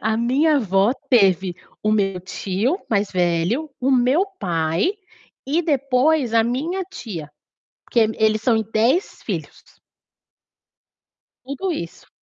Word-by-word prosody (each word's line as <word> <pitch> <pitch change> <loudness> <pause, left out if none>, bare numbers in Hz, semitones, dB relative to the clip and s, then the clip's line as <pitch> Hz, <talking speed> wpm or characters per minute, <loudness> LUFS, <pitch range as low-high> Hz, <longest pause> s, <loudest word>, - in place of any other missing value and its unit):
a 220 0 0
minha 275 +7 +2
avó 200 -1 +2 0.2
teve 190 -6 +3 0.3
o 215 - +1
meu 195 -4 +1
tio 200 - -2
mais 205 -2 0
velho, 180 - 0
o 260 +2 +1
meu 260 +8 +3
pai 165 - 0 0.5
e 310 +5 +1
depois 275 -3 +1
a 225 -1 +4
minha 315 +11 -2
tia. 210 - -8 0.6
Porque 235 - +1
eles 220 0 +2
eles 215 0 +2
são 235 0 +3
em 220 - +1
10 250 - +1
filhos. - - -5 1.8
Tudo 280 +8 -3
isso. 170 - -7
230 Hz, 130 wpm, -21 LUFS, 195-275 Hz, 1.8 s, a